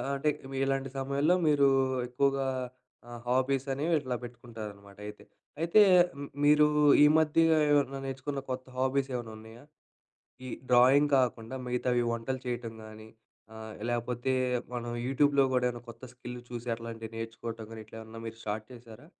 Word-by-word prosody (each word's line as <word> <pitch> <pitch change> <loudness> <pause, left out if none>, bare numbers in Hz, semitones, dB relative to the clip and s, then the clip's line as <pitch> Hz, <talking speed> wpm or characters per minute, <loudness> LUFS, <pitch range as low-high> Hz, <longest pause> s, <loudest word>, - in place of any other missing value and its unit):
అంటే 140 +2 +1 0.3
ఇలాంటి 135 0 -1
సమయంలో 140 +5 +2
మీరు 145 -2 +5 0.4
ఎక్కువగా 135 +2 +1 0.6
ఆ! 120 - -11 0.2
హాబీస్ 130 +2 +1
అనేవి 155 +5 0
ఇట్లా 130 -2 -3
పెట్టుకుంటారనమాట 110 -4 -10
అయితే. 105 0 -10 0.4
అయితే 170 +6 +5 0.3
హ్మ్. 140 0 -7
మీరు 150 0 +6 0.4
ఈ - - +9
మధ్య 160 0 +3 0.3
ఏమైనా 140 -2 +2
నేర్చుకున్న 135 +1 -4
కొత్త 130 0 -4
హాబీస్ 135 +1 +1
ఏమన్నా 120 -3 -4
ఉన్నాయా? 110 +3 -13 0.8
ఈ - - -6 0.2
డ్రాయింగ్ 130 +4 +5
కాకుండా 125 0 -1
మిగతావి 125 0 0
వంటలు 120 +3 -3
చేయటం 120 -2 -3
గానీ 110 0 -11 0.5
ఆహ్, 110 -1 -8
లేకపోతే 120 +2 -1 0.4
మనం 120 0 -4 0.2
యూట్యూబ్‍లో 140 +1 +3
కూడా 125 -1 +2
ఏమైనా 120 -1 -6
కొత్త 115 +2 -10
స్కిల్ 125 0 -8
చూసి 120 0 -7
అట్లాంటివి 115 -1 -8
నేర్చుకోవటం 115 0 -6
గాని 110 - -8
ఇట్లా 110 - -12
ఏమన్నా 110 0 -10
మీరు 115 0 -7
స్టార్ట్ 105 +1 -3
చేశారా? 120 +3 -13
125 Hz, 145 wpm, -30 LUFS, 115-135 Hz, 0.8 s, ఈ